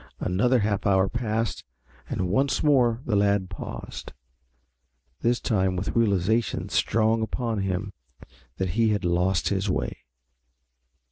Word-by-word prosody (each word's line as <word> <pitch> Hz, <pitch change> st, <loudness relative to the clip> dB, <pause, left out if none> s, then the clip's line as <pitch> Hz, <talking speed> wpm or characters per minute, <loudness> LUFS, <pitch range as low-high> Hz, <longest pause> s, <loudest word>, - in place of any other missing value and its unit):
Another 115 Hz, +8 st, +2 dB
half 105 Hz, -1 st, 0 dB
hour 95 Hz, -1 st, +3 dB
passed 115 Hz, -1 st, -2 dB, 0.5 s
and 90 Hz, -, -1 dB
once 135 Hz, +9 st, +1 dB
more 125 Hz, -6 st, +3 dB
the 110 Hz, -, 0 dB
lad 100 Hz, -2 st, +2 dB
paused, -, -, -7 dB, 1.1 s
this 120 Hz, +1 st, +1 dB
time 95 Hz, -5 st, 0 dB
with 90 Hz, +2 st, -2 dB
the -, -, -2 dB
realization 110 Hz, 0 st, +1 dB
strong 110 Hz, +1 st, +2 dB
upon 115 Hz, -1 st, -2 dB
him 95 Hz, +1 st, -2 dB, 0.6 s
that 95 Hz, -1 st, -1 dB
he 110 Hz, +6 st, +2 dB
had 105 Hz, -3 st, 0 dB
lost 90 Hz, -1 st, +1 dB
his 100 Hz, 0 st, -1 dB
way. -, -, -2 dB
105 Hz, 130 wpm, -25 LUFS, 95-115 Hz, 1.1 s, hour